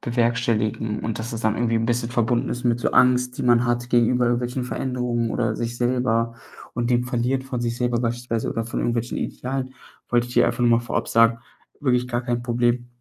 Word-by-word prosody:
bewerkstelligen 115 -2 0
und 110 -1 -3
dass 115 +2 -5
es 115 - -4
dann 110 -1 +1
irgendwie 115 -1 0
'n 115 0 0
bisschen 120 0 0
verbunden 120 0 +1
ist 125 - -4
mit 120 -1 +2
so - - 0
Angst, 125 0 +3
die - - -2
man 120 0 +4
hat 120 0 -1
gegenüber 120 +1 +3
irgendwelchen 120 +1 -1
Veränderungen 125 -2 -2
oder 110 -2 -1
sich 120 0 -3
selber 120 -2 0 0.4
und 120 +1 -1
den 120 0 +2
verliert 125 +1 -1
von 130 -2 -4
sich 120 0 -2
selber 120 -1 0
beispielsweise 120 -1 -2
oder 115 - -2
von 115 - -4
irgendwelchen 120 0 -1
Idealen. 130 0 -4 0.3
Wollte 120 0 +1
ich 125 - -9
dir - - +5
einfach - - -1
nur 120 -1 +4
mal - - -3
vorab 120 - -2
sagen, 115 0 +4 0.4
wirklich 125 -3 +1
gar 120 -1 -1
kein 120 -1 -2
Problem. 120 0 0
120 Hz, 210 wpm, -23 LUFS, 115-125 Hz, 0.4 s, dir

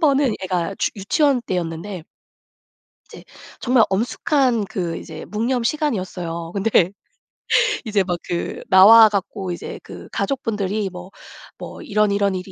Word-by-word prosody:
번은 280 -6 +3
애가 185 0 -2
주 - - 0
유치원 275 - +1
때였는데 175 -1 -4 1.1
이제 - - -12 0.4
정말 245 -1 +3
엄숙한 240 - +1
그 180 -5 -4
이제 160 -2 -9
묵념 235 +3 -1
시간이었어요. 185 - -2
근데 200 +2 0 1.2
이제 210 -3 +1
막 180 -1 -2
그 170 - -3
나와 220 +4 +9
갖고 195 -2 -3
이제 175 - -7
그 - - -11
가족분들이 215 -6 -2
뭐 180 +1 -10 0.5
뭐 - - -9
"이런, 210 0 +1
이런 200 -1 +1
일이 185 +1 -6
200 Hz, 270 characters per minute, -21 LUFS, 185-230 Hz, 1.2 s, 나와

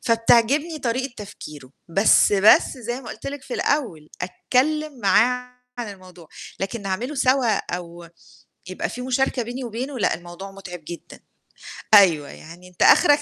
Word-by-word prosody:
فبتعجبني 240 +7 +2
طريقة 255 +1 -2
تفكيره. 150 -10 -10 0.2
بس 195 +4 +4
بس 200 +2 +6
زي 240 +2 -5
ما 245 - -11
قُلت - - -9
لِك 280 0 -6
في 265 - -7
الأول، 200 - -1
أتكلّم 275 +9 -1
معاه 250 +5 +2 0.2
عن 235 - -4
الموضوع، 180 -4 -15 0.3
لكن 200 +3 -4
نعمله 200 +9 -3
سوا 255 -5 +2 0.2
أو 170 -1 -10 0.6
يبقى 185 - -4
في 250 - -7
مشاركة 255 0 0
بيني 245 +3 -6
وبينه 250 +3 -5
لأ - - +2
الموضوع 175 +3 -10
متعب 195 -2 -9
جدًا، 170 - -10 0.7
أيوه، 170 -9 +6
يعني 170 +3 -13
أنت 180 - -14
أخرك 290 0 +6
230 Hz, 145 wpm, -22 LUFS, 185-255 Hz, 0.7 s, بس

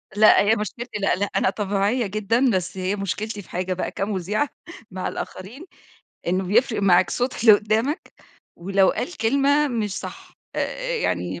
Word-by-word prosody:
لأ 215 +1 +6
هي 215 +2 +3
مشكلتي 215 +2 -5
لأ، 195 - +2
لأ 200 +2 0
أنا - - +3
طبيعية 205 +3 0
جدًا، 215 +6 +1
بس 185 +1 -3
هي 185 +2 -1
مشكلتي 205 +2 -4
في 180 - -19
حاجة 185 +1 -2
بقى 185 - -3
كمُذيعة 205 +6 -1 0.4
مع 185 0 -4
الآخرين، 230 - -7 0.6
إنه 185 +2 0
بيفرق 220 +3 +2
معاك 185 -1 +4
صوت 250 +1 -2
اللي 225 - +9
قدامك، 220 - 0 0.4
ولو 190 +2 +2
قال 355 - -4
كلمة 280 +6 +2
مش 215 -6 -2
صح. - - -9 0.2
آآ، - - 0 0.3
آآ - - 0
يعني 90 - -2
205 Hz, 165 wpm, -23 LUFS, 190-235 Hz, 0.6 s, اللي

